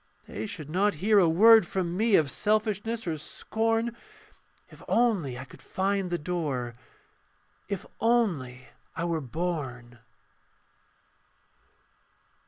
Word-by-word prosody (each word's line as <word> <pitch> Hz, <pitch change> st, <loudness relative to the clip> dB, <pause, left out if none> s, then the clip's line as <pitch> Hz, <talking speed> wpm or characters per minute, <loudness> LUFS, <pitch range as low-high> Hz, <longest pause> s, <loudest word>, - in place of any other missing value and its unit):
They 110 Hz, +2 st, -5 dB
should 150 Hz, +4 st, -7 dB
not 200 Hz, +4 st, +2 dB
hear 205 Hz, +6 st, +4 dB
a 175 Hz, -4 st, +4 dB
word 220 Hz, +3 st, +7 dB
from 175 Hz, -2 st, -2 dB
me 220 Hz, +1 st, +3 dB
Of 150 Hz, -6 st, +3 dB
selfishness 215 Hz, -, -1 dB
or 160 Hz, -3 st, -2 dB
scorn, 225 Hz, +8 st, -1 dB, 0.8 s
If -, -, -15 dB
only 200 Hz, -, +1 dB
I 130 Hz, -, -7 dB
could -, -, -16 dB
find 195 Hz, 0 st, -1 dB
the 175 Hz, -, -1 dB
door, 150 Hz, -8 st, -3 dB, 1.0 s
If 200 Hz, -3 st, -3 dB, 0.2 s
only 170 Hz, -, 0 dB, 0.3 s
I 165 Hz, -, -2 dB
were 165 Hz, -2 st, -1 dB
born. 130 Hz, -5 st, -4 dB
180 Hz, 115 wpm, -27 LUFS, 145-215 Hz, 1.0 s, word